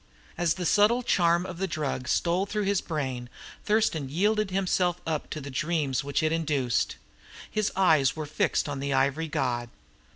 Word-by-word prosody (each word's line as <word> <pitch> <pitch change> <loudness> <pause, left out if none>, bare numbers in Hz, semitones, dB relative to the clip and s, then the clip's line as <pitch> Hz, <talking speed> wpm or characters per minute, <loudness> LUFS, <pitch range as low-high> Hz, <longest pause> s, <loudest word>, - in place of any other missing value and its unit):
As 170 -2 +1
the 180 - -4
subtle 215 +7 +4
charm 175 -4 +2
of 180 -2 -7
the 195 - 0
drug 145 -6 -3
stole 175 +8 +1
through 210 +1 -1
his 200 -1 +1
brain, 130 -6 -4 0.4
Thurston 210 -10 +1
yielded 210 +6 +1
himself 185 -2 +1
up 160 -2 -2
to - - -4
the 140 -1 -7
dreams 150 -3 -1
which 140 +2 -1
it 155 - +2
induced. 145 -8 0 0.6
His 215 -1 0
eyes 160 -8 +4
were 155 -1 -4
fixed 150 - 0
on 145 -1 -4
the 140 0 -1
ivory 140 +4 +1
god. 125 -6 -1
160 Hz, 170 wpm, -27 LUFS, 140-185 Hz, 0.6 s, subtle